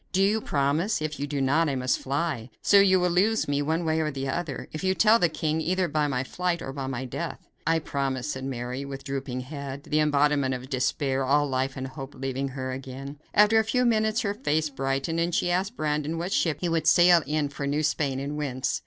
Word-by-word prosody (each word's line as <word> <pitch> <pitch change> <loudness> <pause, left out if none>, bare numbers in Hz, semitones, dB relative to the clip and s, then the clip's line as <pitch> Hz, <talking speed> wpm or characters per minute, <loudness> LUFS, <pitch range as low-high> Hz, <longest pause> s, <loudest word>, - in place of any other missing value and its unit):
Do 190 +1 +2
you 210 +3 +2
promise? 150 +9 0
If 155 -1 -4
you 145 - -2
do 145 -1 -2
not, 150 +4 +2
I 140 - -1
must 130 0 0
fly; 135 -3 -2
so 200 - +6
you 190 -1 +5
will 180 0 +1
lose 205 +6 +2
me 145 0 0
one 160 +3 -1
way 160 0 +1
or 155 -1 0
the 135 -2 -4
other, 150 0 -3
if 155 - -6
you 190 0 +2
tell 220 +3 +5
the 175 - +3
king; 155 0 -1
either 185 +2 +1
by 150 -1 0
my 130 -2 -1
flight 180 +4 -2
or 135 - -6
by 135 -1 -4
my 130 -1 -3
death." 125 - -5 0.2
"I 165 0 +4
promise," 135 -4 -2
said 130 - -5
Mary, 125 0 -4
with 140 -1 -7
drooping 135 -2 -4
head; 140 0 -7
the 150 - 0
embodiment 145 -3 +2
of 130 +2 -9
despair; 135 +1 0
all 145 +2 +3
life 130 0 -1
and 130 - -4
hope 135 +1 -8
having 135 +1 -3
left 135 - -9
her 130 -1 -3
again. 135 +2 -7 0.2
After 210 +2 +6
a - - +3
few 250 +3 +1
minutes 220 0 +2
her 200 -3 -1
face 160 - -1
brightened, 135 +4 -1
and 170 0 0
she 175 - +1
asked 195 +6 -1
Brandon 150 0 -1
what 175 +4 -2
ship 155 -4 +1
he 175 - 0
would 165 -2 0
sail 175 -1 +6
in 150 -1 0
for 140 0 -4
New 145 +2 0
Spain, 145 -3 0
and 140 +2 -4
whence. 130 -4 -2
145 Hz, 235 wpm, -26 LUFS, 135-170 Hz, 0.2 s, so